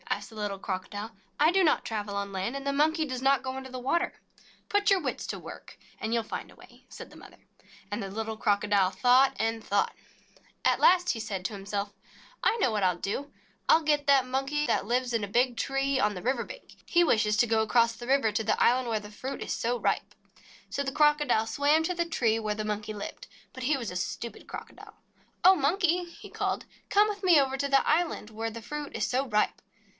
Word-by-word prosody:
asked - - -2
the - - -13
little 205 -2 -3
Crocodile. 205 +3 -5 0.2
"I 305 +3 +5
do 380 +1 +3
not 315 - +2
travel 210 -2 -4
on 200 0 -3
land, 195 +6 -3
and 275 0 -5
the 280 - 0
Monkey 315 +3 +2
does 255 -3 -4
not 270 0 +3
go 260 0 -4
into 265 -1 -8
the 255 - -5
water." 340 +8 -1 0.5
"Put 410 0 +2
your 390 -1 +5
wits 275 -7 -3
to - - -4
work, - - -11 0.2
and 220 +1 -2
you 235 - +3
'11 225 - -7
find - - -5
a - - -17
way," - - -18
said - - -10
the - - -16
mother. - - -15 0.5
And 205 +2 -2
the 195 - -5
little 220 +2 -4
Crocodile 205 -2 +2
thought 255 +4 +4
and 225 0 -1
thought. 200 -1 0
3 - - -33
JATAKA - - -30
TALES - - -28 0.3
At - - -5
last 355 0 +5
he 230 - -4
said 195 -4 -4
to 215 - -2
himself: 200 0 -4 0.5
"I 460 - +3
know 260 - +2
what 210 -1 -1
I - - +5
'11 180 -1 -2
do. 195 - -1
1 285 - -21 0.4
'11 320 -1 +5
get 295 -1 +1
that 270 -2 +5
Monkey 270 +3 -1
that - - +1
lives 245 +2 0
in 225 -2 0
a - - -2
big 245 +4 +2
tree 270 0 0
on 210 -3 +1
the 180 - -7
river 245 0 0
bank. - - -12
He 345 0 +3
wishes 215 -8 +2
to 240 - +4
go 225 0 +2
across 230 +1 +3
the 240 +2 -9
river 265 -5 +3
to 215 +2 -1
the 215 0 0
island 250 +1 +3
where 220 -1 0
the 210 0 -11
fruit 260 +6 -6
is - - -3
so 240 +1 -1
ripe." - - -1 0.6
So - - -1
the 270 - -3
Crocodile 295 -6 +3
swam 290 +7 +2
to 360 - -1
the 340 0 0
tree 230 -9 +1
where 215 -1 -2
the 215 0 -4
Monkey 210 0 -3
lived. 210 - -7 0.3
But 260 - -7
he 280 +3 +2
was 235 -7 -5
a - - -8
stupid 215 +5 -5
Crocodile. - - -10 0.5
"Oh, 375 +2 +8
Monkey," 355 +3 +1
he 340 - -13
called, - - -2 0.2
"come 415 +1 +5
with 415 -1 -5
me 350 -5 +6
over 270 -1 +1
to 280 +1 -1
the 275 -1 +3
island 315 -8 +1
where 225 +1 -4
the 230 +1 -8
fruit 290 +5 -6
is - - 0
so 260 +2 0
ripe." 210 -2 0
245 Hz, 240 wpm, -28 LUFS, 215-290 Hz, 0.6 s, Oh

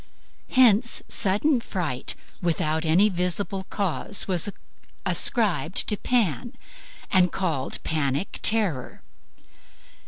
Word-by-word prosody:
Hence 235 -2 +3
sudden 235 +6 +1
fright 160 - -3 0.3
without 160 -2 -1
any 180 +7 +4
visible 190 +1 -2
cause 200 +1 0
was 185 0 +1 0.6
ascribed 195 -7 +3
to 210 - +2
Pan, 235 - -1 0.6
and 180 -2 +3
called 160 -8 -3
a - - -7
Panic 150 +2 -3
terror. 195 - 0
190 Hz, 95 wpm, -24 LUFS, 160-215 Hz, 0.6 s, any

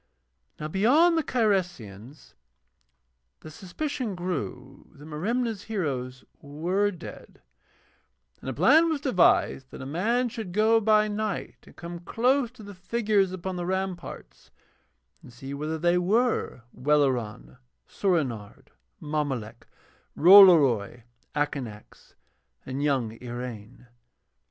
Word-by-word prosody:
Now 150 - -4
beyond 270 - +3
the 320 - +1
Cyresians 175 - -2 1.1
the 155 - -11
suspicion 225 - -5
grew 155 -6 -6
that 145 0 -14
Merimna's 210 +7 -3
heroes 130 - -4 0.2
were 175 +8 -1
dead, 180 -5 -11 1.0
and - - -6
a - - -3
plan 305 - +5
was 315 -3 -1
devised 180 - +2
that - - -11
a - - -7
man 220 - 0
should 220 -6 -7
go 220 +3 +4
by 215 0 +3
night 210 -1 -4
and - - -17
come 170 0 -8
close 245 +7 +1
to 225 - -14
the 205 0 -10
figures 200 0 0
upon 185 0 -5
the 175 - -3
ramparts 185 - -5 0.7
and - - -14
see 135 +4 -9
whether 155 +3 -3
they 175 +2 +2
were 215 - 0
Welleran, 125 - 0 0.3
Soorenard, 135 - -2 0.3
Mommolek, 140 -7 -4 0.5
Rollory, 150 - +6 0.3
Akanax, 135 -8 -5 0.5
and 130 +2 -4
young 130 -6 -1
Iraine. 120 -1 -8
175 Hz, 115 wpm, -26 LUFS, 135-210 Hz, 1.1 s, Rollory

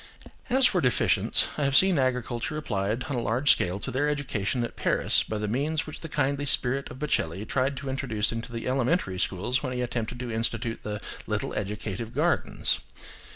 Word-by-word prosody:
As 260 +1 +4
for 185 -7 +3
deficients, 125 -3 +3
I - - +1
have 140 -1 +2
seen 185 -3 +5
agriculture 125 +2 -1
applied 110 -4 -1
on 140 - -3
a - - 0
large 120 +5 +3
scale 90 +2 +1
to 130 - -3
their 145 +4 +1
education 125 -5 -1
at 120 - -5
Paris - - +2
by 110 - -3
the 105 0 -2
means 145 +8 0
which 155 - -8
the 165 - -6
kindly 140 0 0
spirit 135 0 +1
of 125 - -9
Baccelli 105 - -1
tried 135 +1 0
to 140 - -6
introduce 130 -6 0
into 115 +1 -5
the 115 -1 -4
elementary 125 - +1
schools 100 +10 0
when 130 -3 -3
he 125 - -2
attempted 120 0 -3
to 125 -2 -4
institute 115 0 -1
the 105 -1 -4 0.3
"little - - -2
educative 105 +2 -4
gardens." - - +1
125 Hz, 190 wpm, -27 LUFS, 110-140 Hz, 0.3 s, seen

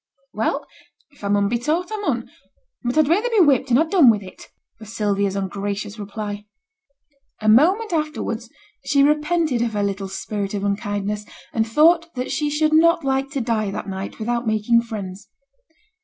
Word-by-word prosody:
'Well! - - -1 0.5
if 285 - -21
I - - -1
mun 200 0 +2
be 235 +3 0
taught, 325 - -1
I 435 - -2
mun; 415 - -2 0.6
but 245 +4 -1
I'd 310 -2 +5
rayther 410 +10 +2
be 455 -3 +2
whipped 275 -2 +2
and 240 - +4
ha' 320 +3 +3
done 320 -7 +6
with 210 -3 +2
it,' 185 - -12 0.3
was 220 -1 -11
Sylvia's 200 -3 0
ungracious 200 +2 -4
reply. 205 0 -6 0.9
A 215 - -3
moment 355 - +4
afterwards, 300 -7 -2 0.3
she 280 -1 +3
repented 300 -2 +1
of 235 -2 -1
her 205 -1 0
little 200 -1 -2
spirit 200 +1 -4
of 200 - -3
unkindness, 205 +1 -2 0.3
and 225 0 +1
thought 330 +7 +4
that 250 0 -3
she 300 -1 0
should 305 +1 +1
not 335 -1 +4
like 270 0 0
to 275 -2 -3
die 225 -3 0
that 195 - -5
night 190 0 -5
without 235 +1 -2
making 220 +2 +3
friends. 205 -4 -7
230 Hz, 175 wpm, -21 LUFS, 205-300 Hz, 0.9 s, done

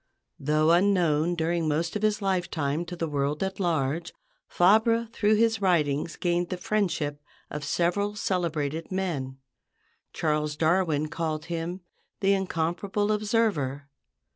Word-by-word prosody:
Though 155 +3 +2
unknown 175 -3 +3
during 165 0 0
most 165 +4 -1
of 210 - -1
his 215 -1 +1
lifetime 170 -5 -1
to 175 +1 -6
the 165 -1 -2
world 145 +2 -1
at 190 +1 -3
large, 165 -2 0 0.4
Fabre 220 +5 +4
through 215 -1 +3
his 225 -1 +2
writings 160 -4 +1
gained 175 0 0
the 185 - -3
friendship 175 -8 -1 0.3
of 150 0 -5
several 180 +7 0
celebrated 165 -6 -2
men. 155 -9 -2 0.7
Charles 150 -1 -1
Darwin 160 -2 +2
called 155 -1 -3
him 170 +3 -4 0.4
the 195 -1 +3
"incomparable 190 +3 -1
observer." 205 - 0
170 Hz, 125 wpm, -27 LUFS, 155-195 Hz, 0.7 s, Fabre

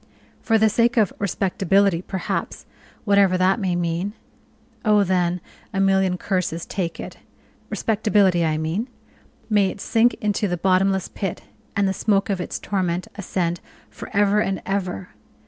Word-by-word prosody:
For 225 - +3
the 220 0 +4
sake 235 +3 +2
of 215 -4 +3
respectability, 195 -2 +1
perhaps, 190 0 -4 0.4
whatever 200 -3 +4
that 185 +3 +3
may 185 -4 0
mean. 175 +3 -1 0.7
Oh, 210 -2 +4
then, 180 -1 +1 0.3
a 195 - -1
million 190 -1 +2
curses 180 -3 -2
take 170 -4 -3
it - - -7 0.5
respectability, 205 -5 +2
I 155 -1 +1
mean; 165 +10 -2 0.6
may 205 -3 +3
it 205 - -8
sink 230 +4 +2
into 210 0 -1
the 175 -1 -2
bottomless 190 +1 +2
pit, 195 -3 -4 0.3
and 200 -1 +2
the 190 - 0
smoke 200 +1 +1
of 190 -2 -1
its - - -4
torment 185 -3 -2
ascend 175 -3 -2 0.3
for - - -9
ever 205 +1 +3
and 195 -2 0
ever! 185 - -3
195 Hz, 145 wpm, -22 LUFS, 180-205 Hz, 0.7 s, the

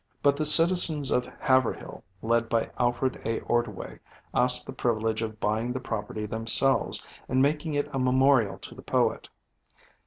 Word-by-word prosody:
But 140 0 +3
the 155 +1 -2
citizens 160 -2 +5
of 125 - 0
Haverhill, 130 -2 -1 0.2
led 115 0 0
by 115 -1 -1
Alfred 125 +1 -1
A. 115 0 -2
Ordway, 110 - -3 0.3
asked 125 0 +1
the - - -8
privilege 110 -2 -2
of 110 -1 -6
buying 110 +4 -2
the 130 - -4
property 105 -3 -5
themselves, 115 +2 +2 0.2
and 130 - 0
making 150 +3 0
it 145 - -1
a 135 - -2
memorial 130 -3 +2
to - - -10
the - - -13
poet. - - -1
125 Hz, 155 wpm, -26 LUFS, 115-135 Hz, 0.3 s, citizens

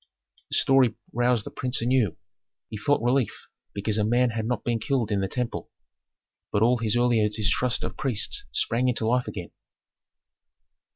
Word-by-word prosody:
This - - +2
story 135 -3 +4 0.2
roused 120 -2 +1
the - - -7
prince 125 0 0
anew; 120 -7 +1 0.5
he - - -5
felt 115 +6 +1
relief 125 0 0 0.3
because 105 +1 -1
a - - +2
man 120 +3 +2
had 110 0 -3
not 125 -3 -2
been 120 -1 0
killed 120 -2 -1
in 100 -1 +1
the 95 - 0
temple, 125 +3 -4 0.8
but 105 - +2
all 120 +1 +3
his 115 0 0
earlier 120 -3 +3
distrust 110 +3 0
of - - -5
priests 135 - 0
sprang 125 +2 +1
into 120 -2 -1
life 125 +2 +1
again. - - -6
120 Hz, 165 wpm, -26 LUFS, 110-125 Hz, 0.8 s, story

